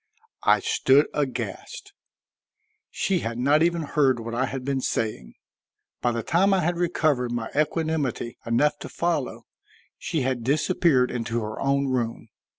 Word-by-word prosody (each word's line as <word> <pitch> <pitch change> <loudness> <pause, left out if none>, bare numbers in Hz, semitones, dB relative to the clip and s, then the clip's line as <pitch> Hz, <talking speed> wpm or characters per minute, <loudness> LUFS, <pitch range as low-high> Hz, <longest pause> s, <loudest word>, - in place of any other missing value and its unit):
I - - +5
stood 140 +3 +4
aghast; 400 - -4 1.0
she 190 -2 0
had 115 -3 -4
not 145 +5 +3
even 170 0 +2
heard 135 -4 +2
what 115 0 -6
I 130 +3 0
had 135 -2 -5
been 135 -1 -1
saying. 110 - -3 0.7
By 120 - +2
the 115 -1 -3
time 195 - +3
I 185 - +1
had 175 +1 0
recovered 155 -8 +1
my 120 -2 -3
equanimity 150 -5 -1
enough 120 +6 +1
to - - -8
follow, 170 -6 -2 0.5
she 160 - -2
had 130 -2 -1
disappeared 140 -1 +2
into 115 -1 -2
her 105 0 -5
own 140 0 +1
room. 115 -3 -2
135 Hz, 150 wpm, -25 LUFS, 120-160 Hz, 1.0 s, I